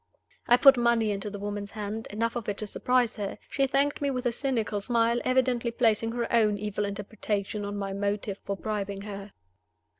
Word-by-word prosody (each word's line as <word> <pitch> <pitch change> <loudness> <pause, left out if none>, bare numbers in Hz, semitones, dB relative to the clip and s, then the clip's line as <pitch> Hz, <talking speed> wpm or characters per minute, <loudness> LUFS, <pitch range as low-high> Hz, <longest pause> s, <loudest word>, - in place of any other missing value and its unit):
I 245 - +7
put 270 +1 +8
money 235 -2 +3
into 200 +1 -3
the 205 - -6
woman's 205 0 -4
hand, 215 +1 -5
enough 225 +3 -1
of 235 -3 -3
it 200 - -2
to 215 - -3
surprise 245 +2 +1
her. 200 -2 -4
She 275 -1 +2
thanked 280 +2 +1
me 285 - +1
with 255 -1 -2
a 245 - +3
cynical 230 -5 -1
smile, 235 +2 +2
evidently 255 -2 +2
placing 225 -1 +1
her 240 -1 -1
own 215 -3 +4
evil 210 0 -2
interpretation 205 0 -3
on 205 0 -4
my 195 -1 -3
motive 200 0 -2
for 200 - -3
bribing 200 -2 -3
her. 200 -1 -8
215 Hz, 190 wpm, -28 LUFS, 205-240 Hz, -, put